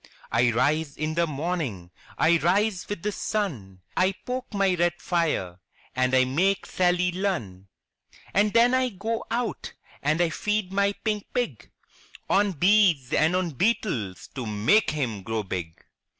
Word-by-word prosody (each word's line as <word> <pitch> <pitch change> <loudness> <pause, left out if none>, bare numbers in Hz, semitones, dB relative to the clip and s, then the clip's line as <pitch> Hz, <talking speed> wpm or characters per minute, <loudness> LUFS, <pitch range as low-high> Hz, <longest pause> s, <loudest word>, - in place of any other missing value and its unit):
'1 120 -1 +3
rise 150 +4 +1
in 155 +1 -2
the 170 +1 +1
morning, 145 - -3 0.3
I 165 +1 +4
rise 190 +4 +1
with 205 -5 -5
the 210 - 0
sun, 130 - -3
I 185 +1 +2
poke 255 +1 -4
my 195 -2 +2
red 175 0 +1
fire 155 - -1 0.4
and 130 0 +2
I 130 0 +5
make 180 +10 +1
Sally 180 0 +1
Lunn! 170 - -3 0.7
And 205 +1 +3
then 235 +2 +5
I 255 0 +2
go 225 +2 -3
out 235 +1 -3 0.3
and 155 +3 +1
I 175 -2 +2
feed 210 +3 -1
my 200 0 +2
pink 210 -2 -1
pig 205 - -2 0.6
On 200 0 +3
bees 180 -6 +3
and 160 +3 +3
on 185 -2 0
beetles 125 - -1
to 125 -4 -5
make 110 - +3
him 125 -9 -2
grow 110 +2 -3
big! 85 -4 -6
175 Hz, 150 wpm, -26 LUFS, 130-200 Hz, 0.7 s, I